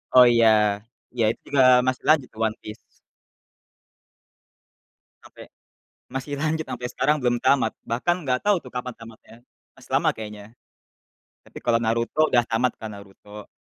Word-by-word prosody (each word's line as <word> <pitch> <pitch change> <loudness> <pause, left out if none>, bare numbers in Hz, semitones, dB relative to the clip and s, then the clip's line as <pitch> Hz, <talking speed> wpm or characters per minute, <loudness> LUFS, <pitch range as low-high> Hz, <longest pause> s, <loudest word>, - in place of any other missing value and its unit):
Oh, 125 -1 +9
iya 115 -1 +4 0.7
iya, 120 -2 -1
itu - - -11
juga 140 -2 +2 0.3
masih 130 0 -1
lanjut 150 -5 +4
tuh 110 - -14
One 110 - -6
Piece. 105 - -9 2.5
Sampai - - -14 0.6
masih 135 +2 -5
lanjut 160 +1 -1
sampai 125 -3 -6
sekarang 150 +4 +1
belum 120 -1 +1
tamat. 130 -5 +2
Bahkan 175 +9 -1
gak 125 -1 0
tahu 205 - +5
tuh - - -12
kapan 125 0 -5
tamatnya, 115 0 -15 0.4
masih - - -19
lama - - +2
kayaknya. 105 +1 -10 0.9
Tapi - - -15
kalau 115 -1 +2
Naruto 115 +7 +1
udah 120 -1 +3
tamat 120 +1 -1
kan 110 -1 -8
Naruto, 100 +1 -13
120 Hz, 145 wpm, -23 LUFS, 110-135 Hz, 2.5 s, Oh